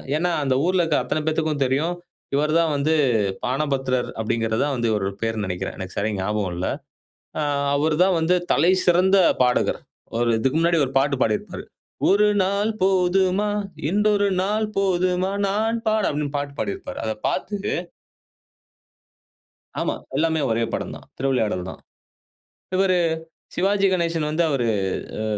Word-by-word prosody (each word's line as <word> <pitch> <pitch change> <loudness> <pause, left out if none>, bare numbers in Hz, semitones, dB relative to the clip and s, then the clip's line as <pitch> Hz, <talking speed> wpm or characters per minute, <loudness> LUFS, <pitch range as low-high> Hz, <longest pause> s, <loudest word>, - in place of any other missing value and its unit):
ஏன்னா, 175 +2 +1
அந்த 130 -1 +1
ஊர்ல 185 0 +2
இருக்கிற 160 -3 +1
அத்தனை 155 +5 -1
பேருக்கும் 155 -3 0
தெரியும். 145 +7 0 0.4
இவரு 150 +2 +1
தான் 160 -3 +1
வந்து 155 +3 +1 0.5
பாணபத்திரர் 135 -2 -1
அப்படிங்கிறது. 115 0 -1
தான் 140 -2 -1
வந்து 120 -2 0
இவர் 105 -2 0 0.2
பெயர்ன்னு 110 -3 -1
நினைக்கிறேன். 90 -1 -4
எனக்கு 95 -1 -7
சரியா 105 0 -1
ஞாபகம் 100 -2 -1
இல்ல. 90 - -2 0.7
ஆ - - +1 0.3
அவரு 155 +2 +1
தான் 185 -3 +2
வந்து 180 +3 +2 0.2
தலை 175 +3 +4
சிறந்த 185 +2 +4 0.3
பாடகர். 125 0 +1 0.4
ஒரு 120 -1 +2
இதுக்கு 135 +6 +1
முன்னாடி 170 -1 +3
ஒரு 130 - -8
பாட்டு 140 0 +1
பாடியிருப்பாரு. 205 -3 -2 0.4
ஒரு 205 +2 +5 0.2
நாள் 200 +3 0
போதுமா? 190 +2 +2 0.4
இன்றொரு 205 +1 +2
நாள் 215 +2 0
போதுமா? 185 0 +1 0.2
நான் 220 +3 0
பாட 215 -1 +1
அப்படின்னு 145 0 -3
பாட்டு 140 0 -4
பாடியிருப்பாரு. 380 -8 -4
அதைப் 110 -1 -4
பார்த்து 205 -1 -3 2.2
ஆமா. - - 0 0.2
எல்லாமே 160 +1 +1
ஒரே 115 +1 +1
படம் - - -4
தான். - - -14
திருவிளையாடல் 110 -9 0
தான். - - -11 0.9
இவரு 185 -1 +3 0.6
சிவாஜி 195 +2 +2
கணேசன் 170 -4 0
வந்து 160 +3 +1
அவரு 125 -5 0 0.5
அ - - -2
160 Hz, 140 wpm, -23 LUFS, 130-190 Hz, 2.2 s, ஒரு